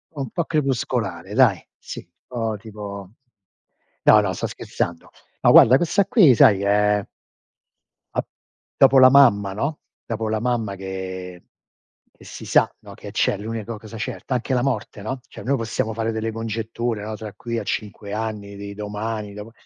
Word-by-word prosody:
Un 135 -4 -4
po' 170 +8 -2
crepuscolare 140 -6 -1
dai - - +4 0.2
sì, - - -9 0.2
po' 115 -3 -3
tipo 100 -2 -8 1.0
no, 105 - +8
no 100 -3 -1
sto - - -3
scherzando. 85 -1 -4 0.3
Ma - - +6
guarda 125 +3 +8
questa 180 +6 +2
qui 170 - +6
sai 105 -2 +6
che 100 - -2
è 105 0 +2 1.1
ap - - -1 0.5
dopo 135 0 +6
la 130 0 +9
mamma, 110 -8 +5
no, 140 +9 -2 0.3
dopo 110 -1 -3
la 110 0 -1
mamma 115 -4 -1
che 95 -1 -6 0.7
che - - -18
si - - -9
sa, - - +3
no - - -12
che - - -10
c'è, 100 - +1
l'unico 110 +1 -5
cosa 110 0 -11
certa. 110 +4 -4
Anche 125 +1 -2
la 125 - +1
morte, 110 -5 -2
no, 130 +5 -4
cioè - - -11
noi 140 +2 +1
possiamo 115 -1 -2
fare 115 +1 -1
delle 110 0 -2
congetture, 115 0 -3
no 110 +1 -5
tra 105 -1 -8
qui 115 +2 -4
a 110 - -4
5 105 0 -4
anni, 105 -2 -4
di 100 0 -7
domani, 105 0 -4
dopo 105 +2 -9
110 Hz, 170 wpm, -22 LUFS, 105-120 Hz, 1.1 s, la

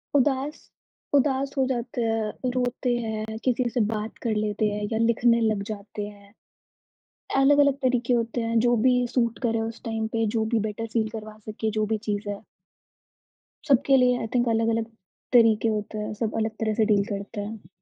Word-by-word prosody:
उदास 280 +2 +1 0.6
उदास 270 0 +1
हो 265 - +3
जाते 240 -1 -2
हैं, 225 +2 -1
रोते 250 0 0
हैं, 220 -1 -4
किसी 255 0 +2
से 245 - -2
बात 215 +1 -5
कर 220 -2 +1
लेते 210 0 0
हैं 210 0 -3
या 220 - 0
लिखने 235 0 +3
लग 215 -3 +1
जाते 205 0 -6
हैं। 200 0 -15 1.1
अलग-अलग 285 0 +5
तरीके 250 -1 +1
होते 235 0 0
हैं, 230 0 0
जो 240 +1 +3
भी 250 - +5 0.2
सूट 235 -2 +1
करे 225 0 0
उस 230 - -12
टाइम 225 -1 -2
पे, 225 0 +2
जो 220 0 0
भी 225 - +4
बेटर 225 +2 -5
फ़ील 220 -2 +1
करवा 215 -1 -8
सके, 215 +1 -4
जो 215 - +2
भी - - +1
चीज़ 205 0 -2
है। 200 0 -4 1.3
सबके 270 0 +4
लिए 250 -1 +4
आई 225 - -3
थिंक 240 0 +2
अलग-अलग 225 0 +1 0.5
तरीके 225 -2 +5
होते 215 0 -2
हैं, 210 0 -3
सब 220 0 -3
अलग 220 0 0
तरह 220 -1 +1
से 220 - +5
डील 205 -2 +3
करते 200 +1 -4
हैं। 210 +1 -8
225 Hz, 180 wpm, -25 LUFS, 215-245 Hz, 1.3 s, अलग-अलग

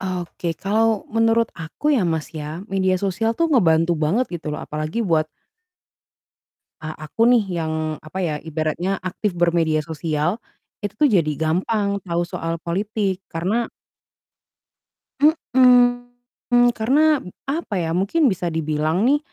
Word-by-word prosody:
Oke, 175 -3 -4
kalau 220 +3 +1
menurut 225 +1 +2
aku 165 - -2
ya, 240 - +2
Mas, 160 -1 -3
ya, 155 +3 -6
media 190 -1 +2
sosial 205 +4 -1
tuh 335 -1 +1
ngebantu 165 - +4
banget 165 +10 +1
gitu 165 -3 -5
loh, 150 - -4
apalagi 155 +7 -4
buat 160 -4 +1 1.5
a 155 -1 -6
aku 230 +9 +2
nih 240 -3 +4 0.2
yang, 160 -1 -2 0.3
apa 155 +5 -8
ya, 160 -4 0
ibaratnya 160 +4 -2
aktif 185 +1 -3
bermedia 165 -3 +2
sosial. 160 +4 -2 0.4
Itu 205 -1 -5
tuh, - - +6
jadi 165 -6 +3
gampang 200 +6 0
tahu 175 -2 -1
soal 165 -1 -4
politik, 195 +2 -2
karena 195 +8 -1 1.5
Mhm, 245 -4 +3
karena, 290 +6 +3 0.3
apa 305 -7 -3
ya, 165 - -2
mungkin 260 - +2
bisa 180 -1 -4
dibilang 155 +4 0
nih, 290 +2 +4
185 Hz, 130 wpm, -21 LUFS, 160-230 Hz, 1.5 s, tuh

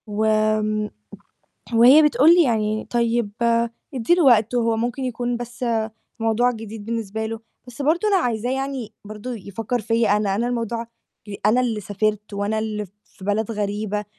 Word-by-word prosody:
وآمم 215 0 +1 0.8
وهي 245 +6 +8
بتقول 290 +1 +5
لي 350 - +6
يعني 215 -4 0
"طيب 235 -2 0 0.6
ادّي 260 +6 +2
له 355 - +2
وقت 235 -2 +4
هو 230 -2 +1
ممكن 240 +3 -2
يكون 245 -1 -2
بس 240 +1 -6 0.5
موضوع 225 +2 +2
جديد 220 -2 -8
بالنسبة 220 -1 -3
له" 225 0 -4 0.3
بس 245 +3 -8
برضه 330 +8 +2
أنا 400 -2 +4
عايزاه 245 - -1
يعني 270 -3 -3
برضه 215 +4 -6
يفكّر 220 +4 -4
فيّا 225 -1 +2
أنا، 200 -2 0
أنا 235 +4 0
الموضوع 235 -1 -3 0.4
بي 205 -2 -8
أنا 230 +4 +4
اللي 230 -4 -1
سافرت 210 +1 -2
وأنا 205 +2 -1
اللي 215 -1 -3 0.2
في 190 - -14
بلد 210 +2 0
غريبة 210 0 -2
225 Hz, 155 wpm, -22 LUFS, 210-245 Hz, 0.8 s, وهي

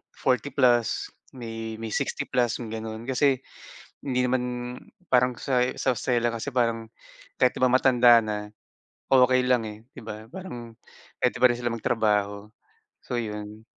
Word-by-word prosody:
40+ 125 -2 +1 0.2
May, 115 -2 -6
may 115 - -4
60+ 120 +2 -1
yung 115 - -6
gano'n. 110 +2 -6
Kasi 130 0 +2 0.6
hindi 125 -2 0
naman 125 0 +1 0.6
parang 125 -2 +2
sa, 125 -3 +1 0.2
sa 130 -2 +1
Australia 120 +1 0
kasi 115 +4 -3
parang 115 -3 0 0.5
kahit 130 -1 +3
di - - -2
ba 130 - +4
matanda 125 -2 +6
na, 105 -1 -4 0.6
okey 130 -1 +5
lang, 125 -3 +3
eh, 105 -1 -7 0.2
di - - -10
ba? 110 0 -8
Parang 120 -11 -9 0.4
pwede - - 0
pa 125 - +7
rin 120 - 0
sila 120 -1 -2
magtrabaho, 105 -3 0 0.5
so 125 - -2
yun. 105 -1 -6
120 Hz, 145 wpm, -26 LUFS, 110-125 Hz, 0.6 s, pa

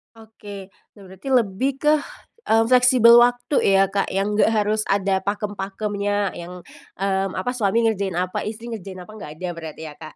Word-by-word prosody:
Oke. 205 -3 -11 0.2
Nah, 205 - -15
berarti 190 +7 -12
lebih 250 0 +1
ke, 300 +2 +2 0.6
mmm, 225 +1 +4
fleksibel 250 -2 +7
waktu 245 +4 +2 0.2
ya, 195 - +5
Kak, 200 0 0
yang 195 +2 -1
nggak 210 - +3
harus 215 -1 +1
ada 195 -1 +1
pakem-pakemnya 205 0 -3
yang, 175 +1 -9 0.3
mmm, 195 0 -1
apa 190 +7 -2
suami 230 -2 +1
ngerjain 200 -5 0
apa, 180 +1 -2
istri 225 +2 -7
ngerjain 190 -4 -8
apa 195 - -14
nggak 215 -8 -9
ada 185 - -4
berarti 160 -2 -9
ya, 155 -2 -8
Kak? 155 -1 -11
205 Hz, 170 wpm, -22 LUFS, 190-225 Hz, 0.6 s, fleksibel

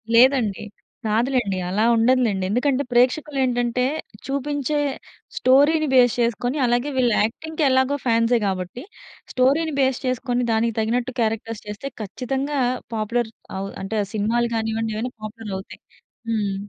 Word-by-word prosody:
లేదండి. 245 -5 +4 0.4
కాదులేండి. 225 -2 +1
అలా 205 +4 +1
ఉండదులేండి. 230 -4 +2
ఎందుకంటే 260 +5 +1
ప్రేక్షకులేంటంటే 250 -1 +1 0.4
చూపించే 285 +1 -2 0.6
స్టోరీని 290 +4 +4
బేస్ 245 -3 +6
చేసుకొని 240 +3 0
అలాగే 245 +4 +1
వీళ్ళు 245 -3 +3
యాక్టింగ్‌కి 315 +8 -3
ఎలాగో 260 +2 +2
ఫాన్సే 230 0 +3
గాబట్టి 190 +5 -3 0.5
స్టోరీ‌ని 285 +5 +2
బేస్ 265 -2 +2
చేసుకొని 250 -1 0
దానికి 225 0 +1
తగినట్టు 240 +3 -1
క్యారెక్టర్స్ 225 -1 -1
చేస్తే 210 +7 -5
ఖచ్చితంగా 270 +7 -3 0.4
పాపులర్ 220 +1 -1 0.3
అవు 195 +1 -3
అంటే 200 +3 -3
ఆ - - -5
సినిమాలు 230 +3 +1
గానివ్వండి 225 0 -1
ఏవైనా 245 +3 -3
పాపులరవుతాయి. 210 -3 -7 0.5
హ్మ్. 210 -3 0
240 Hz, 120 wpm, -22 LUFS, 220-260 Hz, 0.6 s, బేస్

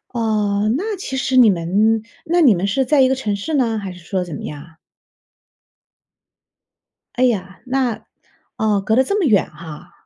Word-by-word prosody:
呃， 215 -2 0
那 415 +5 -3
其 265 -8 -5
实 260 - -1
你 245 -3 +7
们 200 +5 +1 0.2
那 345 +2 +1
你 260 - +6
们 180 +3 -2
是 265 +7 0
在 275 +1 +3
一 260 - +4
个 265 - +1
城 215 -6 -2
市 205 +11 -5
呢， 235 -5 +1
还 200 -3 -5
是 180 - -12
说 180 +2 -3
怎 175 - -8
么 - - -7
样 145 -1 -7
啊？ 165 -1 -20 2.4
哎 255 - +1
呀， 195 -6 -1
那， 250 -4 -1 0.5
哦， 210 -2 +1
隔 220 +2 -1
得 260 - +5
这 400 +9 -1
么 385 - +1
远 215 -9 +2
哈。 160 +2 -11
220 Hz, 195 characters per minute, -19 LUFS, 190-260 Hz, 2.4 s, 你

